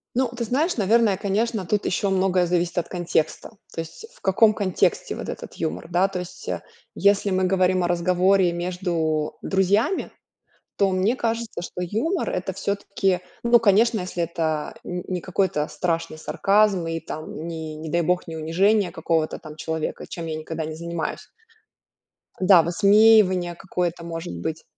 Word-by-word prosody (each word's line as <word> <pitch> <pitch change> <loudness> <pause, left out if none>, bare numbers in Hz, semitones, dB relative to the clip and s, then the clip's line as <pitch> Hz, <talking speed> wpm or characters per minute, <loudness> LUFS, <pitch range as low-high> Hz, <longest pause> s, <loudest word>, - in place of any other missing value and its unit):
Ну, 255 0 +2
ты 240 0 -4
знаешь, 295 - 0
наверное, 215 -1 +3
конечно, 210 +1 -1
тут 205 +3 0
ещё 195 +2 0
многое 185 -1 +2
зависит 175 0 0
от 175 - 0
контекста. 175 -3 -1 0.2
То - - -6
есть 165 - -10
в - - -23
каком 215 +3 +4
контексте 195 -4 0
вот - - -6
этот - - -7
юмор, 85 - -3
да? 180 +2 +3
То 185 - -4
есть, 180 0 -8
а, - - -3 0.3
если 200 0 +3
мы 185 -1 +1
говорим 185 -1 +2
о - - +1
разговоре 180 +1 +3
между 170 -3 -2
друзьями, 200 - +1 0.7
то 200 -1 +3
мне 190 +7 +1
кажется, 230 -3 -2
что 180 +1 -6
юмор- 235 - -1
это 185 +1 -3
всё-таки, 195 -1 -1 0.2
ну, 235 0 +6
конечно, 220 +1 +4
если 180 -1 -3
это 160 -2 -2
н 180 0 -4
не 180 -1 -2
какой-то 180 -4 0
страшный 165 -2 -2
сарказм 195 +1 +2
и 165 0 -2
там, 155 0 -7
ни, 160 -2 -5
не 155 +1 -7
дай 170 +1 +2
бог, 180 +1 0
не 165 - -5
унижение 185 +6 +2
какого-то 160 -1 -1
там 155 0 -10
человека, 160 0 -4
чем 170 -1 -6
я 160 -1 -3
никогда 160 0 -5
не 155 0 -5
занимаюсь. 170 0 -4 1.1
Да, 185 -2 +7
высмеивание 200 -1 +4
какое-то, 175 -1 -3
может 165 +1 -5
быть. 160 0 -4
180 Hz, 160 wpm, -23 LUFS, 165-200 Hz, 1.1 s, Да